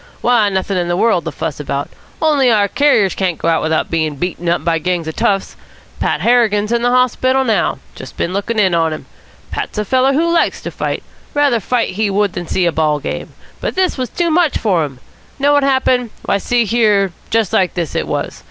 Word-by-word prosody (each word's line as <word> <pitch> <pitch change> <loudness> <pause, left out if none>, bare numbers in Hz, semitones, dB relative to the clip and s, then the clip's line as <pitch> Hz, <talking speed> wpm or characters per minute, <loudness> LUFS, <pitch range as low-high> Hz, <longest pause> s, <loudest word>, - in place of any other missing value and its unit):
"Why, 235 -4 +3
nothing 190 0 -1
in 175 - -1
the 175 0 0
world 195 -6 +2
to 165 - -3
fuss 155 -1 -4
about, 140 -1 -3 0.4
only 290 -5 +3
our 210 -3 +3
carriers 215 -6 +2
can't 180 -4 -1
go - - -3
out 165 -1 +2
without 160 0 -1
being 155 -3 0
beaten 175 +2 -3
up 170 - 0
by 165 -1 +1
gangs 175 -1 -2
of 160 - -5
toughs. 195 -1 0 0.4
Pat - - 0
Harrigan's 225 -3 +2
in 235 0 +1
the 245 - +2
hospital 255 +1 +2
now. 220 -6 +1 0.2
Just 130 - -11
been 175 - -2
looking 205 +4 -2
in 190 -4 +3
on 165 -1 +1
him. 155 - -8 0.5
Pat's - - -4
a 210 - -1
feller 260 +4 +2
who 335 +4 +1
likes 335 - +1
to - - -5
fight. - - -3 0.3
Rather 285 -5 +3
fight 235 +4 0
he 210 +2 -1
would 200 -1 +1
than 175 -1 -5
see 185 - 0
a 170 - +2
ball 155 -2 +1
game. 145 - -5 0.3
But - - -3
this 370 -1 +1
was 255 -2 -3
too 340 -2 -1
much 330 -2 +2
for 185 -7 +1
him. 135 -3 -10 0.4
Know 285 +1 +3
what 290 - +4
happened? 260 -3 +1 0.2
Why, 200 - +1
see 240 +3 +1
here, 210 -4 +2 0.2
just 225 -4 0
like 185 -2 +2
this 170 -4 -3
it - - -2
was. 60 - -3
205 Hz, 220 wpm, -16 LUFS, 175-250 Hz, 0.5 s, what